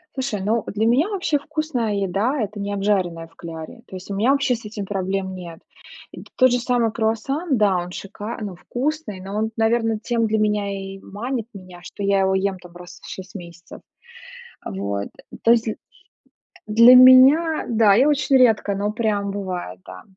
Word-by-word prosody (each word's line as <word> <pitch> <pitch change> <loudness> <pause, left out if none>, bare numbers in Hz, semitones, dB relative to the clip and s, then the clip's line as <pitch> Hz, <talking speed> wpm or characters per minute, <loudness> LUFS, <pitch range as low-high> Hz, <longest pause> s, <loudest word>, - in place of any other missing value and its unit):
Слушай, 260 -6 -3
ну 220 +1 +1
для 215 +2 -1
меня 270 - +2
вообще 365 -7 0
вкусная 290 -8 -3
еда- 200 +8 -1
это 210 0 -4
не 205 0 -4
обжаренная 185 -5 -1
в 165 - -28
кляре. 165 +7 -9
То 185 - -9
есть 185 - -12
у 200 - -3
меня 225 +7 +2
вообще 275 -3 +1
с 235 - -11
этим 210 -2 -6
проблем 190 -1 -3
нет. 170 -2 -9 0.5
И - - -10
т - - -21
тот 255 -1 +5
же 245 - +1
самый 240 -2 0
круассан, 260 +8 -1
да, 205 -3 +3
он 175 0 -4
шика 205 +5 -7
ну 200 -4 -5
вкусный, 265 - -4
но 195 +2 -7
он, 220 +1 -1
наверно, 225 -1 +1
тем 230 0 -1
для 220 0 0
меня 210 -1 0
и 195 0 -7
манит 230 +4 -5
меня, 185 -3 -12
что - - -10
я 195 -1 +2
его 190 0 +2
ем 190 0 0
там 175 -1 -15
раз 175 0 -13
в - - -12
6 190 +2 -9
месяцев. 170 -2 -11 0.8
Вот, 100 +1 -4 0.3
то 230 - +5
есть 235 -1 +3
дл 220 - -2 0.9
для 230 +4 +7
меня 265 +6 +7
Да, 220 -3 +4
и 250 +6 +4
очень 290 -2 +3
редко, 220 -5 +3
но 205 +1 -1
прям 210 -2 -1
бывает, 180 - -5
да, 95 0 -11
210 Hz, 190 wpm, -21 LUFS, 190-240 Hz, 0.9 s, для